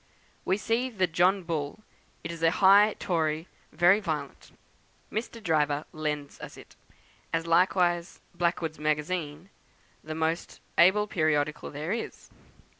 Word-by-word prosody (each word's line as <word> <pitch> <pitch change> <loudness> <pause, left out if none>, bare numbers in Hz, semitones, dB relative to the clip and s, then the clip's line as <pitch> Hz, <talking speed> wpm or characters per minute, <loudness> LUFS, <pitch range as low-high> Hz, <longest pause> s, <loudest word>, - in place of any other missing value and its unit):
We 190 - +1
see 230 +4 0
the 195 -6 +1
'John 180 +3 +2
Bull;' 160 +3 -4 0.4
it 165 - -4
is 165 -1 -8
a 165 - +5
high 200 +4 +5
Tory, 160 -1 -1 0.2
very 180 +4 +4
violent. 155 -8 -5 0.6
Mr. 230 +1 -5
Driver 150 -2 +1
lends 150 -2 -4
us - - -9
it, - - -15 0.6
as 165 0 -1
likewise 175 0 +2
'Blackwood's 170 -2 -1
Magazine,' 155 +3 -2 0.5
the 155 0 -6
most 160 +1 -2 0.2
able 190 +4 +5
periodical 155 -5 0
there 150 +4 -5
is. 230 +1 -5
170 Hz, 125 wpm, -28 LUFS, 155-190 Hz, 0.6 s, a